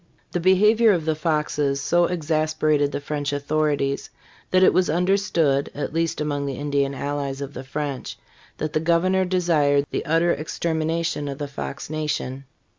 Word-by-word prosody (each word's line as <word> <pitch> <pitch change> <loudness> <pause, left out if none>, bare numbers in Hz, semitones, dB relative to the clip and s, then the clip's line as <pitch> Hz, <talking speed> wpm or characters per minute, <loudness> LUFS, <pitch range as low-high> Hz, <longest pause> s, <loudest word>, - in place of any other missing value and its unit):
The 175 - -1
behavior 210 +5 +5
of 165 -4 -1
the 160 - +2
Foxes 150 -3 0
so 175 +5 +2
exasperated 155 -3 +1
the - - -3
French 145 0 -3
authorities 145 -1 -1 0.4
that 185 0 +4
it - - +6
was 185 - +2
understood 170 -5 +1
(at 145 - -4
least 165 -1 -1
among 145 -2 -2
the 135 - -3
Indian 140 -1 0
allies 140 -1 -3
of 140 0 -6
the 130 - -7
French) 140 0 -4 0.4
that 155 -1 -3
the - - +2
governor 175 +4 +2
desired 160 -6 +2
the - - -2
utter 165 +2 +3
extermination 160 0 -2
of 140 -1 -4
the 145 -1 -4
Fox 140 +1 -6
nation. 150 -3 -3
155 Hz, 160 wpm, -23 LUFS, 145-170 Hz, 0.4 s, it